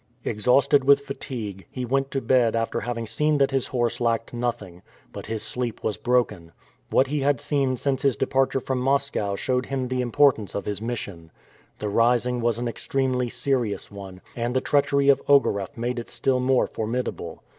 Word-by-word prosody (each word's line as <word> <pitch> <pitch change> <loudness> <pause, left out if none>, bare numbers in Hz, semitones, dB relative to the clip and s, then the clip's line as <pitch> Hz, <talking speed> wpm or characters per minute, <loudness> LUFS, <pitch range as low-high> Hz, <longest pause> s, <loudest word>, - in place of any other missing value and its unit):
Exhausted 130 +5 +3
with 140 +1 +5
fatigue, 115 -8 -6
he 125 -1 -4
went 135 +2 0
to 135 - -2
bed 120 -4 +3
after 115 0 -1
having 115 -1 -3
seen 150 +6 +1
that 140 -1 +2
his 135 -2 0
horse 120 -2 -1
lacked 115 0 0
nothing; 115 -7 -4 0.3
but - - -8
his 110 -1 -4
sleep 125 -3 -4
was 105 - 0
broken. 105 -9 0 0.4
What 130 - +4
he 145 +2 -2
had 140 -2 +2
seen 135 -2 0
since 135 +1 -1
his 140 -4 +2
departure 135 +4 +1
from 130 0 -2
Moscow 135 -6 0
showed 125 +4 -1
him 130 -2 -2
the 130 0 0
importance 120 - +2
of 100 - -3
his 105 -1 -3
mission. 100 -8 -5 0.5
The 105 - -4
rising 120 +3 +2
was 115 -1 +1
an 120 0 -2
extremely 125 +1 -1
serious 120 -4 -2
one, 95 -2 -10
and 120 +1 -2
the - - +4
treachery 140 0 +2
of 140 - +5
Ogareff 110 -10 +2
made 120 +1 -2
it 115 - -8
still 130 +2 0
more 130 0 +3
formidable. 110 -7 -4
125 Hz, 180 wpm, -24 LUFS, 115-135 Hz, 0.5 s, with